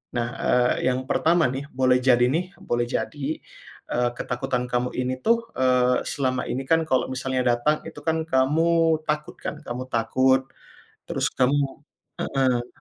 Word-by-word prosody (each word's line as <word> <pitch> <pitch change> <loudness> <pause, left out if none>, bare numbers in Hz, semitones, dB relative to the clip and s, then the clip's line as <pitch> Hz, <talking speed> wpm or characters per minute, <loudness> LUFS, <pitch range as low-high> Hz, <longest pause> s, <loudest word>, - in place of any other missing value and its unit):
Nah, 120 -1 0
eee, 125 +1 +2
yang 130 0 0
pertama 165 +5 +2
nih 135 +2 -5
boleh 130 -1 +3
jadi 125 -2 +5
nih, 165 +4 +1 0.2
boleh 120 0 +1
jadi, 145 +3 -3 0.7
eee, 120 0 +1
ketakutan 125 0 -2
kamu 125 0 0
ini 125 0 0
tuh, 230 0 +2
eee, 125 -1 +3
selama 130 -3 -1
ini 135 - -2
kan 165 0 +3
kalau 130 - +2
misalnya 130 0 -1
datang 150 +6 +1
itu 160 - -9
kan 160 0 +2
kamu 130 +5 +3 0.4
takut 150 0 -2
kan, - - -4
kamu 125 +1 -4
takut 130 +3 +3 0.7
terus - - -1
kamu 135 +3 +3 0.6
heeh. 130 -3 0
130 Hz, 150 wpm, -24 LUFS, 125-145 Hz, 0.7 s, jadi